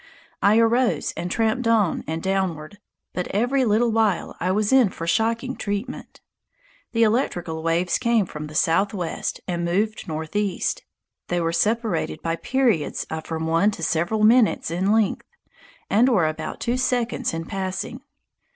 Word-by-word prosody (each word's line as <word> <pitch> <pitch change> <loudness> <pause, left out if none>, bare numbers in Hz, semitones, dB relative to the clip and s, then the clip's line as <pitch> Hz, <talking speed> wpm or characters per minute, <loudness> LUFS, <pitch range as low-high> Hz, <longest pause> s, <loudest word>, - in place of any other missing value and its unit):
I 205 +2 +5
arose 230 +2 +2
and 175 - -4
tramped 225 +4 0
on 220 -6 +2
and 160 +1 -3
downward, 190 -2 -2 0.3
but 180 - -3
every 250 +6 +1
little 225 +2 +2
while 220 -5 +1
I 180 +2 0
was 210 +4 +1
in 255 -6 +6
for 165 - -7
shocking 230 +7 0
treatment. 205 +5 -5 0.7
The 230 -1 +3
electrical 175 -8 0
waves 165 +2 +1
came 235 -4 +2
from 150 -3 -7
the 150 - -11
southwest 180 +1 0
and 175 -1 -2
moved 200 +5 -1
northeast. 170 +5 -2 0.5
They 175 - 0
were 165 -1 -1
separated 220 +5 0
by 165 0 -1
periods 235 - 0
of 160 0 -4
from 160 -1 -3
one 165 +5 +3
to 185 -5 -6
several 175 +7 0
minutes 225 -6 +4
in 185 +4 +1
length, 220 -3 +1 0.6
and 230 +6 +4
were 185 -10 +3
about 155 0 -5
two 240 +1 0
seconds 250 -2 0
in 165 0 -4
passing. 190 +6 -4
200 Hz, 150 wpm, -23 LUFS, 170-230 Hz, 0.7 s, in